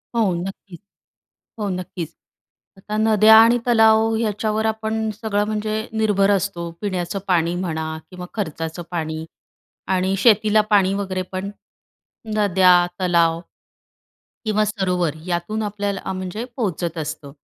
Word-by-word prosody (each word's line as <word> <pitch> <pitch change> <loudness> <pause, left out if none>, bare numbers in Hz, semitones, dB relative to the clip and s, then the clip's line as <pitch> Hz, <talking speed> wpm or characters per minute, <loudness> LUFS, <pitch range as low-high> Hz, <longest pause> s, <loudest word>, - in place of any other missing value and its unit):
हो, 215 -6 +2
नक्कीच. 185 0 -7 0.8
हो, 210 - -1
नक्कीच. 180 -3 -5 0.6
आता 210 +2 -5
नद्या 220 0 +6
आणि 230 +2 +6
तलाव 225 -1 +4
याच्यावर 215 0 -1
आपण 220 0 -1
सगळं, 210 -1 -1
म्हणजे 215 +1 -2
निर्भर 210 -3 +2
असतो. 185 -3 -1
पिण्याचं 185 -2 -2
पाणी 170 -2 +2
म्हणा 160 -3 -3
किंवा 180 -1 -7
खर्चाचं 165 -4 -4
पाणी 160 -2 -3 0.7
आणि 185 +1 +1
शेतीला 215 0 +4
पाणी 195 -2 +4
वगैरे 190 -2 -2
पण 190 +1 -4 0.9
नद्या, 190 -3 +5 0.2
तलाव 170 -2 +2 1.1
किंवा 215 -1 +2
सरोवर 180 -6 -1
यातून 180 +5 -2
आपल्याला 200 -2 -3
म्हणजे 185 +4 -5
पोहोचत 175 -7 -2
असतं. 150 -2 -5
195 Hz, 115 wpm, -21 LUFS, 175-215 Hz, 1.1 s, नद्या